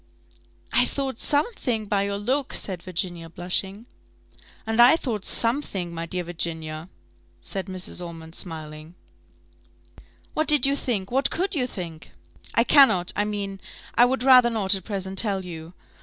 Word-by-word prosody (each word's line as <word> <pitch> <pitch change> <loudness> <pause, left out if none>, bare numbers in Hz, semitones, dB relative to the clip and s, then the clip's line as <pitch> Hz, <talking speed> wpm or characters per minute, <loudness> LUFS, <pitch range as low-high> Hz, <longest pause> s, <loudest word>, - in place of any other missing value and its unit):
"I - - +6
thought 270 -4 -3
something 285 - 0
by 200 -1 0
your 200 0 -2
look," 260 +7 -1
said 185 -4 -2
Virginia, 175 -2 -3
blushing. 190 +5 -2 0.8
"And 225 +1 +3
I 245 +6 +8
thought 230 - -4
something, 230 -8 -1
my 165 0 -5
dear 180 +1 -3
Virginia," 160 -1 -4 0.5
said 195 -2 -5
Mrs. 185 -1 -3
Ormond, 165 -1 -9
smiling. 155 -1 -7 1.4
"What 310 - 0
did 295 -2 +5
you 275 +1 +2
think? 215 -8 -3
What 270 +2 +2
could 375 +5 -1
you 260 -6 0
think?" 170 -8 -8 0.4
"I 230 - +5
cannot 245 -11 +5
I 205 - +1
mean, 200 -2 -4 0.3
I 240 - +6
would 255 0 0
rather 255 -2 +7
not 210 -4 +1
at 190 -2 -2
present 190 -2 -2
tell 195 -4 +1
you. 165 0 -9
195 Hz, 150 wpm, -24 LUFS, 175-245 Hz, 1.4 s, I